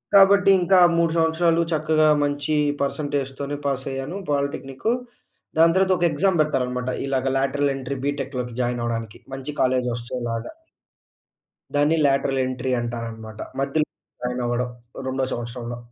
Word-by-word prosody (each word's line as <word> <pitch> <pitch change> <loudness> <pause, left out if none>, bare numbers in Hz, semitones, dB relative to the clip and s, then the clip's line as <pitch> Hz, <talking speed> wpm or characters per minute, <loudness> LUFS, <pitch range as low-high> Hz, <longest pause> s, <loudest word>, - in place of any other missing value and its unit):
కాబట్టి, 200 0 +7
ఇంకా 185 +2 +4 0.2
3 170 -1 +3
సంవత్సరాలు 165 +1 +3
చక్కగా 155 0 +3 0.2
మంచీ 145 +1 -1 0.3
పర్సంటేజ్‌తోనే 140 -1 -2
పాసయ్యాను 135 +4 -3
పాలిటెక్నిక్కూ. 140 - -1 0.6
దాని 165 +1 +6
తర్వాత 190 0 +4
ఒక 175 - -2
ఎగ్జామ్ 175 +3 +2
పెడతారనమాట. 125 -4 -1 0.2
ఇలాగ 135 -1 0
లేటరల్ 140 +1 +1
ఎంట్రీ 135 +1 -4
బీటె‌క్‌లోకి 135 -4 -3
జాయినవ్వడానికి 120 -3 -2
మంచి 135 +2 -5
కాలేజొస్చేలాగా. 120 -2 -1 1.2
దాన్ని 145 +3 +3
లేటరల్ 135 -1 +2
ఎంట్రీ 130 0 -2
అంటారనమాట. 115 -2 -6 0.2
మధ్యలో 145 +3 +1 0.4
జాయినవ్వడం 125 0 -1 0.4
రొండో 130 0 0
సంవత్సరంలో. 120 0 -5
135 Hz, 110 wpm, -23 LUFS, 125-155 Hz, 1.2 s, కాబట్టి